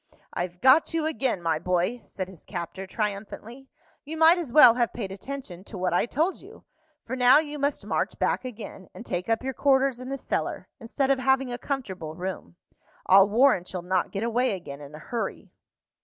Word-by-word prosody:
"I've 175 0 -4
got 295 +6 +5
you 320 -2 0
again, 265 - -1
my 160 -2 +1
boy!" 180 +7 0
said 185 -2 -6
his 185 -3 -14
captor, 185 +1 -6
triumphantly. 215 +5 -5 0.4
"You 315 +3 -7
might 325 +2 +6
as 310 -8 -5
well 245 -4 +9
have 240 -1 0
paid 200 -5 -5
attention 195 -3 -7
to 205 - -8
what 180 -1 -1
I 175 - +2
told 320 +10 0
you, - - -15 0.4
for 255 - -4
now 250 +1 +6
you 295 -1 -2
must 285 +1 -1
march - - -1
back - - 0
again, 215 -6 -9
and 240 - -9
take 180 0 -3
up 225 +1 +1
your 265 0 -3
quarters 270 -2 +2
in 255 +1 -7
the 275 - -3
cellar, - - -3
instead 270 +4 -1
of 270 - +2
having 265 -1 +1
a 245 - -5
comfortable 190 - -5
room. 180 - -6 0.5
I'll 195 +1 +6
warrant 220 -5 +3
you'll 180 -2 -4
not 185 0 0
get 200 +2 -3
away 235 -1 +1
again 145 -6 -9
in 145 +1 -10
a - - -8
hurry." 230 +9 -5
230 Hz, 200 wpm, -26 LUFS, 185-270 Hz, 0.5 s, well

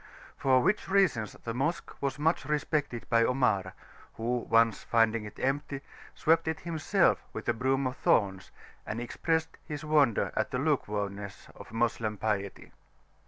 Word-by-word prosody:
For 130 -2 +3
which 210 +1 +1
reasons 185 - +2
the 115 - -3
Mosque 145 +8 -2
was 140 -1 -1
much 160 +3 +1
respected 150 -4 -1
by 115 0 +4
Omar, 100 -7 +1 0.4
who, 120 +2 -1
once 115 0 +4
finding 115 -1 +2
it 105 0 -10
empty, 135 +1 -1 0.3
swept 165 +1 +2
it 160 0 -2
himself 165 -2 +1
with - - -6
a - - +3
broom 130 +3 0
of 130 0 -2
thorns, 95 -3 +1 0.3
and 110 - -4
expressed 160 +6 -1
his 150 0 -6
wonder 145 -8 +3
at - - 0
the - - -2
lukewarmness 100 -1 -2
of - - -12
Moslem 115 -2 -1
piety. 100 -1 -3
125 Hz, 150 wpm, -29 LUFS, 110-150 Hz, 0.4 s, by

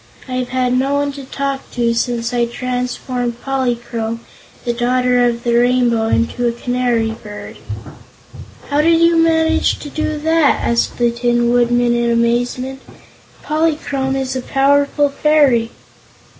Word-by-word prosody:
I've 255 -1 -3
had 255 -1 0
no 270 +2 +1
one 285 0 0
to 275 -1 -9
talk 275 0 -4
to 235 -1 +1
since 235 0 -1
I 240 -1 +2
transformed 250 0 -3
Polychrome, 240 -4 -2 0.4
the 240 - 0
Daughter 250 +1 +2
of 235 -1 0
the 235 - 0
Rainbow, 240 -2 +2
into 235 +2 0
a - - +2
canary 240 -1 -1
bird." 215 -2 -9 1.1
"How 290 +1 +3
did 330 +1 +4
you 335 0 +4
manage 325 0 +2
to 290 - -9
do 310 0 -2
that?" 320 -1 +2
asked 235 0 0
the 240 -1 +2
Tin 240 0 +1
Woodman, 240 0 +2
in 235 0 +1
amazement. 245 +3 0 0.6
"Polychrome 300 -4 -1
is 265 -1 -2
a 260 - -2
powerful 285 +2 +2
fairy!" 280 -6 +3
250 Hz, 140 wpm, -17 LUFS, 235-275 Hz, 1.1 s, did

